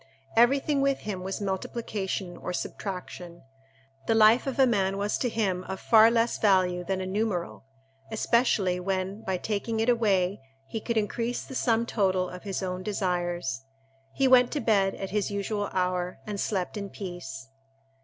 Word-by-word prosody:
Everything 275 +4 +4
with 275 -1 +1
him 200 -3 -4
was 190 +1 -4
multiplication 195 -2 -3
or 180 - -5
subtraction. 180 -2 -6 0.6
The 225 - +3
life 225 +4 +5
of 265 - -2
a 265 - +6
man 195 -5 +1
was 205 +1 0
to 245 - 0
him 195 -5 -1
of 190 0 -5
far 225 -1 +6
less 230 0 +1
value 185 -3 +3
than 190 +1 -2
a - - -3
numeral, 190 -6 -2 0.4
especially 220 -5 +2
when, 190 +2 -2
by 190 -1 -1
taking 220 +3 -2
it 225 +2 +2
away, 200 - +2 0.2
he 220 +11 -5
could 235 +1 -2
increase 230 +3 -1
the - - -10
sum 235 -2 +1
total 190 -5 0
of 180 - -8
his 195 -1 -4
own 180 0 -3
desires. 175 -8 -2 0.5
He 270 - +2
went 250 -1 +6
to 300 - 0
bed 195 -6 +2
at 195 -1 -6
his 210 0 0
usual 205 0 -2
hour, 180 -1 -1
and 210 -1 -4
slept 195 0 -2
in 200 -1 -5
peace. 155 -10 -7
200 Hz, 165 wpm, -27 LUFS, 185-225 Hz, 0.6 s, a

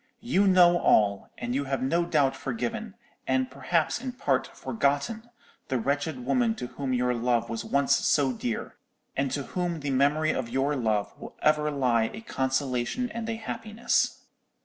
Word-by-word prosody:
You 205 -3 +2
know 175 -2 +6
all, 100 -8 +3
and 120 0 -3
you 140 +2 0
have 135 -2 -2
no 170 +6 +1
doubt 145 -5 +2
forgiven, 225 -2 -4 0.3
and 130 -1 +1
perhaps 155 - 0
in 255 -1 -4
part 135 - 0
forgotten, 140 - -1 0.4
the 130 - 0
wretched 140 +1 -2
woman 235 - +2
to 125 - -5
whom 135 +2 -4
your 125 0 +1
love 120 -1 0
was 115 - -3
once 140 0 +2
so 135 -3 +2
dear, 120 -1 -4 0.4
and 140 0 0
to 140 +2 -2
whom 175 0 -3
the 140 -1 -2
memory 145 +4 +2
of 120 -3 -3
your 135 +4 0
love 110 -5 0
will - - -10
ever 150 0 +3
lie 125 -6 +1
a 220 - -8
consolation 135 - -1
and 230 -1 -4
a 225 - -1
happiness. 225 +1 -1
140 Hz, 170 wpm, -27 LUFS, 130-180 Hz, 0.4 s, know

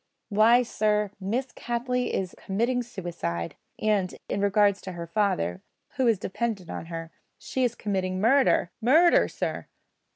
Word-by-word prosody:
Why, 225 +4 +5
sir, 210 -3 0
Miss 240 +7 -2
Cattley 245 +1 -2
is 185 -1 -2
committing 235 +6 -1
suicide; 175 - -4 0.2
and, 205 -4 0
in 200 - -2
regard 200 0 +4
to 190 -2 -8
her 170 -1 -6
father, 165 - 0 0.3
who 260 -2 0
is 225 -3 +4
dependent 195 -1 -3
on - - -6
her, 165 -1 -6 0.3
she 260 - -2
is 240 -1 +1
committing 185 -3 -2
murder 235 -5 +3
murder, 320 +9 +5
sir!" - - -4
210 Hz, 140 wpm, -27 LUFS, 185-240 Hz, 0.3 s, Why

